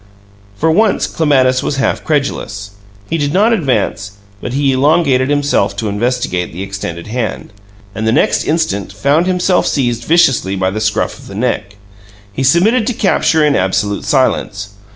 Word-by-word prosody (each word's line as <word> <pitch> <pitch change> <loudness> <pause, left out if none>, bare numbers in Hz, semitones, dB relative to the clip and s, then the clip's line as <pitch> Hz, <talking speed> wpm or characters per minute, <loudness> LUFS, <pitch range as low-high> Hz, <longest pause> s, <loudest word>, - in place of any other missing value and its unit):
For 160 +9 +1
once 215 +5 +2
Clematis 130 -5 +2
was 145 - -2
half 135 - -1
credulous. 105 -9 -2 0.4
He 165 - -2
did 145 0 -1
not 215 +5 +3
advance, 125 - -1 0.3
but 125 - -5
he 140 0 +1
elongated 135 -1 +2
himself 145 0 +1
to 110 - -2
investigate 105 -4 -2
the 90 +4 -6
extended 95 -4 -6
hand, 110 -3 -4 0.4
and 110 +2 -3
the - - +3
next 140 - +2
instant 150 - -1
found 140 - +1
himself 180 0 +1
seized 120 -4 -1
viciously 135 - +2
by 95 0 0
the 110 +2 -4
scruff 105 0 -1
of - - -14
the 100 - -9
neck. 105 -3 -2 0.6
He 130 - -4
submitted 205 - +3
to 250 - 0
capture 165 -6 +2
in 145 -2 +2
absolute 100 +2 0
silence. 105 -6 0
130 Hz, 160 wpm, -14 LUFS, 105-155 Hz, 0.6 s, not